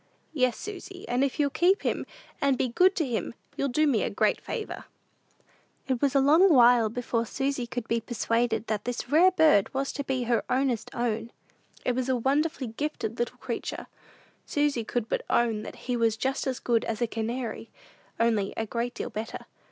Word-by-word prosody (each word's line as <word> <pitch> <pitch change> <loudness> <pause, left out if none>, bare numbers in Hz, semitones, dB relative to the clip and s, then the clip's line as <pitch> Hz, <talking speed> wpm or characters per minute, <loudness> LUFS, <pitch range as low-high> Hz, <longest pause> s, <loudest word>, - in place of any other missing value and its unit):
"Yes, 255 -5 +1
Susy; 380 -2 -8
and 245 +2 +1
if 275 +1 -1
you'll 285 -1 +2
keep 365 +6 +3
him, - - -1 0.3
and 275 -2 +3
be 255 - 0
good 370 +10 +4
to 320 - +1
him, 235 -2 -3 0.2
you'll 280 - 0
do 305 +5 +2
me 265 -7 +2
a - - 0
great - - +1
favor." 440 - -5 1.0
It 260 -3 -1
was 280 -1 +2
a - - +6
long 320 +8 +6
while 240 -4 +6
before 230 0 -1
Susy 270 -1 -2
could 240 -1 -5
be 230 0 0
persuaded 230 0 0
that 215 -2 -2
this 245 +1 -4
rare 340 +5 +7
bird 310 - +4
was 275 +1 -1
to 285 - -3
be 265 -2 -1
her 235 -2 +1
"ownest 255 -3 0
own." 230 -1 -2 0.5
It - - +3
was 255 +1 -2
a 260 - +3
wonderfully 280 +3 0
gifted 230 -2 -4
little 240 - -2
creature. - - -5 0.6
Susy 290 -5 +1
could 225 0 -2
but - - -1
own 230 -3 +2
that - - -8
he 250 - 0
was 230 -2 +1
just 265 +4 -1
as 260 -1 -1
good 235 -2 +1
as 220 - -3
a 240 - +2
canary, 230 +1 -4 0.5
only 220 -4 +1
a 225 - -1
great 235 +3 -3
deal - - -4
better. 220 +1 -5
245 Hz, 190 wpm, -27 LUFS, 230-280 Hz, 1.0 s, rare